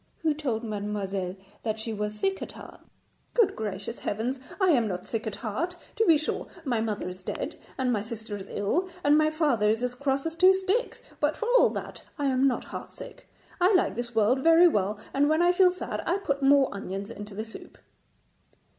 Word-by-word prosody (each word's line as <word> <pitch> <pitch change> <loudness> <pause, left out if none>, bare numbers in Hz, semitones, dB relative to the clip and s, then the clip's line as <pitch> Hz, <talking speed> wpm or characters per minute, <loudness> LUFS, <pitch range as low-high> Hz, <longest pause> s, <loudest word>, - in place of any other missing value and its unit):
Who 315 -2 +3
told 260 -7 -2
mademoiselle 200 -3 -3 0.3
that 220 -1 -2
she 225 0 -3
was 210 0 -3
sick 390 0 0
at - - -6
heart?' - - -12 0.5
'Good 460 -5 +4
gracious 210 +1 -4
heavens! 240 +6 -2 0.2
I 380 -2 +4
am 240 -7 +3
not 180 -2 -4
sick 225 -1 -3
at 215 - -3
heart. 310 - -3 0.2
To 450 - +2
be 325 -2 +7
sure 310 - -3 0.2
my 240 -5 +1
mother 215 -4 -2
is 180 0 -7
dead, - - -4 0.2
and 255 -2 +1
my 210 - 0
sister 220 -1 -5
is 195 -1 -8
ill, 315 - 0
and 290 +1 +5
my 310 0 +4
father 290 -10 +2
is 225 +3 +1
as 250 0 0
cross 275 +2 -1
as 325 - -2
two 370 +2 +6
sticks, 385 +6 -1 0.2
but 295 +1 +1
for 450 - -3
all - - +6
that - - -6 0.2
I 290 - -1
am 265 0 +3
not 255 - 0
heart - - -8
sick. - - -11 0.3
I 365 +3 +4
like 365 - +3
this 240 -1 -4
world 225 +4 +3
very 330 +2 +7
well, 205 - +1 0.2
and 285 +2 +3
when 315 +2 +3
I 350 - +5
feel 365 0 +5
sad 365 +1 -4
I 355 - +2
put 280 -8 -2
more 275 0 +5
onions 195 +1 -5
into 205 -2 -8
the 215 +2 -4
soup.' 225 - -11
250 Hz, 210 wpm, -27 LUFS, 210-320 Hz, 0.5 s, be